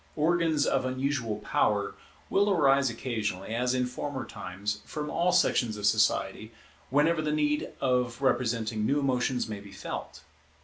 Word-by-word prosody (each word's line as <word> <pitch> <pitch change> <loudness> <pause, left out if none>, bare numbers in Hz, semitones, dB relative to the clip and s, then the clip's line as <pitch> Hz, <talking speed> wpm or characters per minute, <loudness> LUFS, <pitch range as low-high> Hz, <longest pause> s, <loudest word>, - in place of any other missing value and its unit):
Organs 160 -1 +2
of 135 - +1
unusual 130 -3 -1
power 105 -1 +1 0.3
will 205 +1 +2
arise 140 -7 +4
occasionally, 110 -4 -3
as 125 +2 +1
in 125 -1 +1
former 130 +2 -4
times, 100 +3 -5
from 150 -1 -5
all 175 +2 +2
sections 110 -9 +2
of 105 - -3
society, 110 0 +1 0.4
whenever 155 +4 +3
the 155 -1 -1
need 150 0 0
of 125 -2 0
representing 115 -5 0
new 140 +7 +2
emotions 130 -2 0
may 105 -2 -5
be 100 0 -12
felt. 100 - -7
125 Hz, 145 wpm, -28 LUFS, 110-145 Hz, 0.4 s, arise